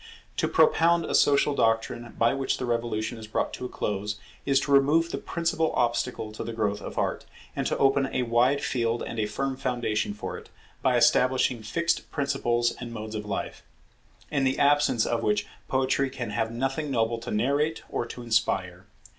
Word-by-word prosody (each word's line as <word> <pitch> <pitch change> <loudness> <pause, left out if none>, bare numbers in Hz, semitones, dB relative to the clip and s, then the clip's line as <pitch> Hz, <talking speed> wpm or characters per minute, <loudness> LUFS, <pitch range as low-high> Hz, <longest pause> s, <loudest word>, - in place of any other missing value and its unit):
To - - +1
propound 170 - +4
a - - -3
social 145 0 +4
doctrine 115 -1 0
by 115 +2 +3
which 135 -1 -1
the 125 - -3
Revolution 115 -1 -2
is 110 - -9
brought 110 - -1
to 125 - -5
a - - -4
close, 105 +1 -2 0.3
is 135 -1 +4
to 140 - -3
remove 150 +5 +4
the - - -3
principal 165 -1 -1
obstacle 120 -2 0
to 110 - -6
the 115 - -5
growth 105 -2 -1
of - - -8
Art, - - -1 0.3
and - - -1
to - - -1
open 135 0 +3
a 130 - 0
wide 125 +4 +2
field 115 -2 0
and 115 - -5
a 105 - +1
firm 135 +5 -2
foundation 115 -5 -1
for - - -5
it, - - -17 0.3
by - - +3
establishing 125 -2 +3
fixed 165 +11 -1
principles 120 -5 0
and 120 -1 -8
modes 110 -1 -6
of 105 -1 -5
life; 100 - -4 0.7
in 140 -2 +1
the 130 0 +1
absence 145 -5 +3
of 120 - 0
which 105 -1 +1 0.2
Poetry 135 +1 +1
can 120 -4 -5
have 115 +1 -1
nothing 135 +6 -2
noble 115 -2 0
to 115 - -7
narrate 140 +8 0
or 120 - -3
to 125 - -8
inspire. 95 -6 0
120 Hz, 190 wpm, -27 LUFS, 110-135 Hz, 0.7 s, propound